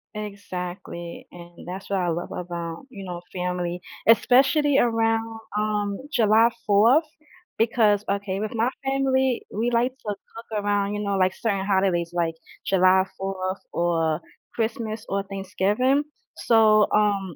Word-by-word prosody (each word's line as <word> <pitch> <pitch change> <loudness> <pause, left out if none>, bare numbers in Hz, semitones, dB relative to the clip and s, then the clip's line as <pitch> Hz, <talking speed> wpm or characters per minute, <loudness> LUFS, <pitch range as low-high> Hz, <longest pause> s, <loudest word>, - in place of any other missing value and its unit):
Exactly, 180 -4 -6
and 175 0 -13
that's 190 +2 -7
what 195 -1 0
I 175 -1 0
love 170 +1 -3
about, 170 +1 -5
you 195 -4 -9
know, 175 -2 -6
family, 180 -1 -3 0.3
especially 270 +5 +5
around, 225 -1 +1 0.2
um, 210 -1 -1 0.2
July 225 0 +5 0.2
4th, 230 +10 +5 0.5
because 215 -3 +3
okay, 200 -1 -2
with 215 +1 -3
my 230 +2 +1 0.2
family, 265 -2 +1
we 235 +3 -1
like 245 +2 +1
to - - -33
look 215 +1 -6
around, 205 0 0
you 205 - -3
know, 200 -1 0
like, 185 0 +2
certain 200 -4 -1
holidays, 190 -4 +1
like, 165 -2 0 0.3
July 185 0 +4
4th 190 0 -3
or 165 -2 +1 0.3
Christmas 220 -1 -3
or 195 0 -1
Thanksgiving, 200 +8 0 0.3
so, 215 -2 +5
um, 200 -5 +1
200 Hz, 135 wpm, -24 LUFS, 185-225 Hz, 0.5 s, especially